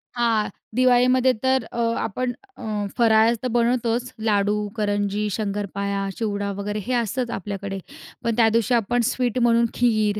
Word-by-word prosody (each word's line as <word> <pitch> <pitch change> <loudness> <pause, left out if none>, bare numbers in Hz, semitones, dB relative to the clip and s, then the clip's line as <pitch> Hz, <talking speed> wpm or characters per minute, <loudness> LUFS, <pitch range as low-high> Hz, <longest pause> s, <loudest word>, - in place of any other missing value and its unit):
हां, 230 -3 +1 0.3
दिवाळीमध्ये 255 +1 +4
तर 260 -2 +2
अ, - - -7 0.2
आपण 245 +4 -2 0.3
अ, - - -10 0.3
फराळ 225 -1 +5
तर - - +1
बनवतोच 240 +1 +1
लाडू, 210 -1 +1
करंजी, 205 0 0
शंकरपाळ्या, 200 -1 -2
चिवडा, 205 -2 -2
वगैरे. 205 +1 -3
हे 255 - 0
असतंच 240 +1 -1
आपल्याकडे. 195 0 -5 0.4
पण 230 -2 0
त्या 225 -2 +5
दिवशी 230 +2 +1
आपण 240 +2 +1
स्वीट 250 -1 -1
म्हणून 235 -1 +4
खीर 215 -3 +1
225 Hz, 140 wpm, -23 LUFS, 205-245 Hz, 0.4 s, फराळ